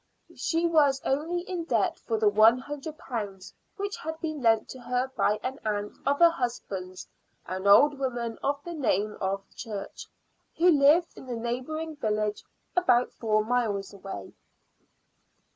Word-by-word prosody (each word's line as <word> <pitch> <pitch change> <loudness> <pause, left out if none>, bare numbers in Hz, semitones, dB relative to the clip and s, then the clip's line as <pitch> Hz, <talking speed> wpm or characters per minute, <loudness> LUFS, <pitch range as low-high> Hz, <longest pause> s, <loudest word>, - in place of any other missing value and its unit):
She 330 +1 0
was 295 -5 +4
only 320 +6 0
in 355 -2 -4
debt 340 0 +1
for 225 - -2
the 215 -1 +2
one 215 +3 +6
hundred 295 +3 -7
pounds, 205 -9 -6 0.2
which 405 0 -3
had 320 0 -6
been 310 -3 -4
lent 225 -2 +3
to 260 - -8
her 250 +2 -1
by 210 -3 +2
an 265 +2 -4
aunt 210 -1 -2
of 285 0 +3
her 340 +1 +7
husband's, 195 - -4 0.4
an 190 +2 -3
old 280 +8 +6
woman 240 -4 -3
of 280 +1 0
the 345 - -6
name 215 - 0
of 195 0 -1
Church, 210 -4 -7 0.5
who 350 +2 +6
lived 305 +3 +4
in 260 - -11
a 245 - -2
neighboring 260 +7 -4
village 215 -3 -1 0.3
about 250 -10 +3
four 215 -2 +1
miles 220 -5 -1
away. 195 - -8
250 Hz, 155 wpm, -28 LUFS, 215-310 Hz, 0.5 s, her